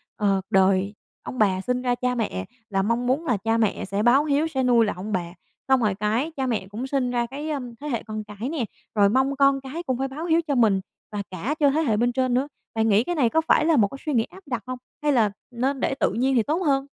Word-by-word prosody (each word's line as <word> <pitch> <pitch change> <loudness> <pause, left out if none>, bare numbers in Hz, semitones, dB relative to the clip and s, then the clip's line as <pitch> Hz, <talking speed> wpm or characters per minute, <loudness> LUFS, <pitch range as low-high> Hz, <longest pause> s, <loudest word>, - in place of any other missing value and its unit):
ờ, 200 -3 +1
đời 190 +1 +3 0.3
ông 255 - -7
bà 190 -3 +3
sinh 250 +3 -1
ra 245 -1 +1
cha 250 0 -1
mẹ 150 - -2 0.2
là 195 -2 +1
mong 235 +4 0
muốn 275 +6 +1
là 245 -8 +1
cha 225 +3 0
mẹ 220 -3 0
sẽ 200 +2 -1
báo 260 +5 +5
hiếu, 295 +1 +2
sẽ 265 -5 -1
nuôi 240 -2 +4
lại 210 - -1
ông 195 +4 -6
bà. 175 -3 -2 0.3
Xong 265 -1 +4
rồi 210 -4 +1
cái, 220 +9 0
cha 265 - 0
mẹ 220 -6 -1
cũng 225 +7 -5
sinh 260 -3 0
ra 240 -1 0
cái, 285 +6 -6
ơm, 250 -5 -4
thế 300 - -5
hệ 235 -6 -2
con 215 -1 -5
cái 210 +5 -6
nè, 300 -7 -2 0.3
rồi 200 -2 +5
mong 265 +5 +2
con 275 0 +3
cái 285 +6 -6
cũng 260 -7 -1
phải 270 +1 -1
báo 290 +5 -6
hiếu 335 -1 +3
cho 285 - +1
mình, 215 -6 +3 0.3
và 205 -1 -3
cả 200 - -2
cho 290 -2 +5
thế 310 +3 +1
hệ 230 -9 +1
bên 240 +2 +2
trên 255 0 0
nữa. 260 +3 +1 0.3
Bạn 225 0 +2
nghĩ 210 +2 +4
cái 350 +6 -2
này 260 -7 +3
có 320 +6 +2
phải 305 - +4
là 320 -2 +4
một 205 -4 +5
cái 275 - -9
suy 300 - -1
nghĩ 230 -3 +3
áp 380 +8 -14
đặt 245 -4 -3
hông 255 0 -4 0.3
hay 295 - +3
là 225 -6 +3 0.2
nên 260 +3 -1
để 270 - 0
tự - - +2
nhiên 260 +3 +1
thì 235 - +4
tốt 305 +8 0
hơn? 275 -2 +2
245 Hz, 275 wpm, -24 LUFS, 215-275 Hz, 0.3 s, báo